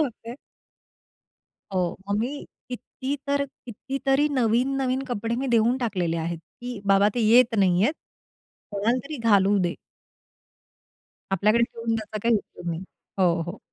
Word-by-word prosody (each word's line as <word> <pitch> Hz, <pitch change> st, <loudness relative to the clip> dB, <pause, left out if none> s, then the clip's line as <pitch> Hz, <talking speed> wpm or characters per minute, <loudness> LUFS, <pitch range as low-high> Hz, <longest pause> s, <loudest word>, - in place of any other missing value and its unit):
होते. 235 Hz, -3 st, -5 dB, 1.4 s
हो, 180 Hz, -3 st, -1 dB
मग 205 Hz, +1 st, +1 dB
मी 270 Hz, +6 st, -3 dB, 0.2 s
किती 260 Hz, +2 st, -5 dB
तर 280 Hz, 0 st, +1 dB, 0.2 s
कितीतरी 270 Hz, +5 st, 0 dB
नवीन-नवीन 260 Hz, +1 st, +1 dB
कपडे 230 Hz, 0 st, -2 dB
मी 270 Hz, +2 st, -2 dB
देऊन 230 Hz, +2 st, +4 dB
टाकलेले 185 Hz, -9 st, -1 dB
आहेत, 165 Hz, +1 st, -3 dB, 0.2 s
की 245 Hz, -3 st, -6 dB
बाबा 195 Hz, +1 st, +5 dB
ते 245 Hz, -, 0 dB
येत 240 Hz, 0 st, +6 dB
नाहीयेत, 190 Hz, -, +3 dB, 0.8 s
कोणालातरी 245 Hz, +9 st, -1 dB
घालू 200 Hz, 0 st, +5 dB
दे. 175 Hz, -2 st, 0 dB, 1.6 s
आपल्याकडे 215 Hz, +5 st, +3 dB
ठेवून 230 Hz, -1 st, -3 dB
त्याचा 215 Hz, 0 st, -5 dB
काही 230 Hz, 0 st, +3 dB
उपयोग 175 Hz, -, -9 dB
नाही. 165 Hz, +1 st, -4 dB, 0.4 s
हो, 175 Hz, -2 st, +3 dB
हो. 175 Hz, +5 st, -7 dB
230 Hz, 125 wpm, -25 LUFS, 195-255 Hz, 1.6 s, येत